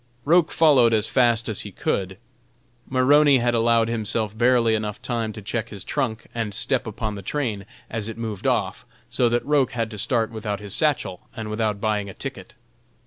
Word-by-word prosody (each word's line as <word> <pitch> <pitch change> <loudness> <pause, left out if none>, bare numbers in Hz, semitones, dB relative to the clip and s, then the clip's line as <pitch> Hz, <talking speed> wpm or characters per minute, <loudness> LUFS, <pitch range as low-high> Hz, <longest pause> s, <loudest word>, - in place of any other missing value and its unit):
Roch 170 +2 +4
followed 130 -8 +5
as 110 0 +1
fast 120 -3 +2
as 110 - -3
he 105 - -6
could. 95 0 -2 0.7
Maroney 140 +2 +5
had 120 -1 +1
allowed 115 0 +3
himself 110 -1 -2
barely 120 -1 +3
enough 105 -1 -2
time 115 -3 -2
to 110 - -9
check 110 +2 -3
his 100 -2 -8
trunk 110 0 -2
and 110 -4 -3
step 130 0 -1
upon 110 0 -4
the 100 - -7
train 105 -3 -3 0.2
as 110 -2 -4
it 115 - -7
moved 110 0 -4
off, 100 -7 0 0.3
so 120 0 +2
that 120 +1 0
Roch 145 -3 +2
had 115 -2 -2
to 105 - -6
start 115 0 +1
without 105 -2 -4
his 100 -2 -1
satchel 130 - 0
and 110 -2 -5
without 105 -2 -1
buying 105 -2 -1
a 95 - -10
ticket. 130 -9 -7
115 Hz, 190 wpm, -23 LUFS, 105-125 Hz, 0.7 s, followed